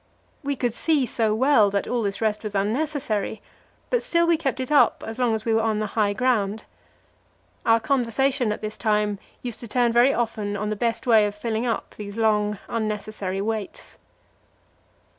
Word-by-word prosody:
We 285 Hz, -1 st, -2 dB
could 245 Hz, -3 st, -1 dB
see 295 Hz, +1 st, +2 dB
so 220 Hz, -3 st, 0 dB
well 240 Hz, -4 st, +4 dB
that 200 Hz, 0 st, -1 dB
all 245 Hz, -1 st, 0 dB
this 200 Hz, -1 st, -2 dB
rest 215 Hz, -1 st, 0 dB
was 210 Hz, -2 st, -6 dB
unnecessary, 220 Hz, 0 st, -1 dB, 0.5 s
but -, -, +2 dB
still 340 Hz, -9 st, +2 dB
we 335 Hz, 0 st, +4 dB
kept 275 Hz, -5 st, -2 dB
it 260 Hz, +2 st, -4 dB
up 295 Hz, -, +4 dB
as 225 Hz, +2 st, -6 dB
long 240 Hz, -3 st, +2 dB
as 220 Hz, -, -5 dB
we 225 Hz, -, +1 dB
were 225 Hz, -, +3 dB
on 220 Hz, -1 st, 0 dB
the 215 Hz, -, -1 dB
high 210 Hz, -2 st, +2 dB
ground. 220 Hz, -3 st, 0 dB, 1.0 s
Our 230 Hz, 0 st, +5 dB
conversation 260 Hz, -1 st, +1 dB
at 210 Hz, -, -4 dB
this 215 Hz, 0 st, -5 dB
time 210 Hz, -2 st, 0 dB, 0.2 s
used 240 Hz, -3 st, -5 dB
to 235 Hz, -, -8 dB
turn 240 Hz, +1 st, +2 dB
very 240 Hz, +3 st, +5 dB
often 215 Hz, -4 st, -2 dB
on 210 Hz, +1 st, -2 dB
the 215 Hz, -, -1 dB
best 230 Hz, +3 st, -1 dB
way 220 Hz, -4 st, +5 dB
of 205 Hz, -, -6 dB
filling 225 Hz, +2 st, -2 dB
up 230 Hz, -, -3 dB
these 205 Hz, 0 st, -7 dB
long, 210 Hz, -2 st, +2 dB
unnecessary 210 Hz, -3 st, -3 dB
waits. 215 Hz, -1 st, -5 dB
225 Hz, 185 wpm, -24 LUFS, 210-250 Hz, 1.0 s, Our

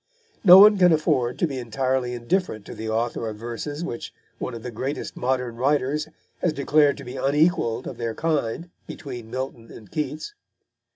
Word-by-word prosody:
No 180 Hz, -3 st, +10 dB
one 205 Hz, 0 st, +8 dB
can 180 Hz, -1 st, +6 dB
afford 130 Hz, -6 st, +1 dB
to -, -, +2 dB
be 135 Hz, -5 st, -4 dB
entirely 125 Hz, +1 st, -1 dB
indifferent 120 Hz, -, -1 dB
to -, -, -8 dB
the 110 Hz, 0 st, -5 dB
author 115 Hz, 0 st, -1 dB
of 105 Hz, -, -7 dB
verses 120 Hz, +7 st, -5 dB
which 120 Hz, -8 st, -5 dB, 0.3 s
one 125 Hz, -, -4 dB
of 115 Hz, -, -9 dB
the 125 Hz, -, -5 dB
greatest 130 Hz, +6 st, -4 dB
of -, -, -19 dB
modern 125 Hz, -2 st, -1 dB
writers 145 Hz, +3 st, +1 dB, 0.3 s
has 170 Hz, -, +1 dB
declared 145 Hz, 0 st, +3 dB
to 140 Hz, -, -9 dB
be 125 Hz, +2 st, -7 dB
unequalled 140 Hz, -3 st, +1 dB
of -, -, -6 dB
their 115 Hz, -1 st, -3 dB
kind 160 Hz, +1 st, -1 dB, 0.2 s
between 125 Hz, -6 st, -8 dB
Milton 125 Hz, -2 st, -6 dB
and 110 Hz, -4 st, -13 dB
Keats. 150 Hz, -, -4 dB
130 Hz, 180 wpm, -24 LUFS, 120-150 Hz, 0.3 s, No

